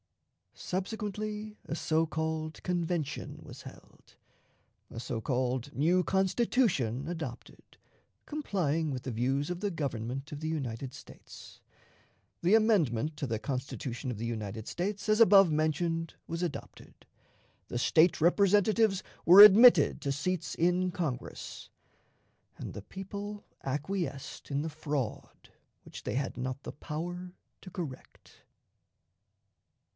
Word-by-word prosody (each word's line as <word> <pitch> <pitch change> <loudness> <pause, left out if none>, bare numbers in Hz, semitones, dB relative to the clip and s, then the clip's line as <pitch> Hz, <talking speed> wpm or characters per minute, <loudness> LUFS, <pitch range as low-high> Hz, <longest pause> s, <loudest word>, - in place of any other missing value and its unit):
Subsequently, 210 +2 -4
a - - -3
so 160 0 +1
called 160 0 -3
convention 170 -4 -2
was - - -11
held, - - -15 0.7
a - - -7
so 115 -1 -4
called 130 +2 -1
new 175 +6 +3
Constitution 190 - +1
adopted, 160 -8 -7 0.5
complying 175 - -1
with 130 -2 -4
the 130 - -4
views 135 +6 0
of 180 -1 -3
the 205 +1 -1
Government 135 -2 -4
of 145 - -6
the 155 - -4
United 130 -4 -4
States, - - -13 0.8
the 180 +5 +5
amendment 160 - +2
to 140 - -3
the 115 -2 -1
Constitution 130 0 -4
of 115 - -5
the 115 - -4
United 110 -2 -4
States 200 +4 -3
as 215 +1 +3
above 195 -5 +7
mentioned 165 +2 0
was 165 +1 -4
adopted, 170 -5 -7 0.6
the 120 - -3
State 160 +7 +4
Representatives 200 +4 +3 0.2
were 180 +4 +9
admitted 210 - +8
to 140 - -1
seats 165 +4 -2
in 180 +2 +2
Congress, 155 -9 -5 0.9
and - - -7
the 105 - -7
people 200 - -7 0.2
acquiesced 145 +1 -4
in 140 +1 0
the 160 - -3
fraud 145 -6 -4 0.3
which - - -10
they - - -3
had 135 +1 -2
not 130 +2 -4
the - - -6
power 175 +4 -6 0.3
to 185 - -10
correct. 165 -8 -9
160 Hz, 125 wpm, -30 LUFS, 135-190 Hz, 0.9 s, were